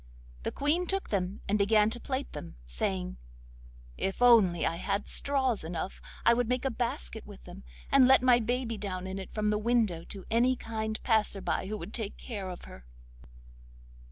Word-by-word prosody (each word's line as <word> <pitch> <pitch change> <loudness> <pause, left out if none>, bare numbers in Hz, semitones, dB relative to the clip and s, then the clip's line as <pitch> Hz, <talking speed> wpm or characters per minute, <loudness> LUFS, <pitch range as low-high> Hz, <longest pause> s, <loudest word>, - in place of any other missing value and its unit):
The - - -3
Queen 320 +5 +1
took 390 0 -2
them 190 -1 -2
and 205 +1 +1
began 210 +1 +4
to 240 - -3
plait 265 +3 -3
them, 85 -4 -8
saying: - - -3 0.8
'If 195 - -1
only 220 -9 +5
I 165 - 0
had 200 +3 -2
straws 265 - +1
enough 165 +3 -5 0.2
I 235 - +7
would 240 -1 0
make 250 +1 0
a 270 - +1
basket 225 - -3
with - - -12
them, - - -11 0.3
and 265 -2 +7
let 265 -1 +6
my 250 -1 +6
baby 240 0 -1
down 185 -2 -4
in 190 +1 -4
it 190 - -8
from 210 -1 0
the 210 - +1
window 215 -7 +1
to 195 -2 -8
any 245 +3 +3
kind 220 -2 -4
passer 220 -4 +2
by 190 - -2
who 215 +1 -3
would 200 +2 -8
take 220 -4 -3
care 200 -6 -6
of 180 - -8
her. 60 - -12
215 Hz, 185 wpm, -30 LUFS, 185-245 Hz, 0.8 s, I